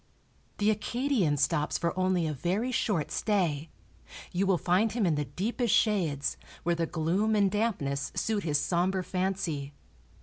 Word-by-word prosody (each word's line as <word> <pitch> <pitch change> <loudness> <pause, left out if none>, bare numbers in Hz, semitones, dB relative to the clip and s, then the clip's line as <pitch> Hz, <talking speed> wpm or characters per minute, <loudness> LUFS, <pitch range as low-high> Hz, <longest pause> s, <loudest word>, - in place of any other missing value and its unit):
The 210 +1 +3
Acadian 215 - 0
stops 150 +2 +1
for 170 +1 -1
only 185 -2 +1
a 155 - -1
very 190 - -1
short 200 - 0
stay; 165 -8 0 0.6
you 190 +2 0
will 190 -2 +3
find 190 +6 +2
him 230 -4 +1
in 170 - +3
the 150 0 -1
deepest 210 - 0
shades, 170 -10 +1 0.3
where 175 - +2
the 165 -1 -1
gloom 175 +7 +1
and 200 -2 +3
dampness 190 -11 -1
suit 220 -2 0
his 150 -3 +1
somber 185 +3 0
fancy. 180 -7 -2
185 Hz, 155 wpm, -29 LUFS, 160-210 Hz, 0.6 s, The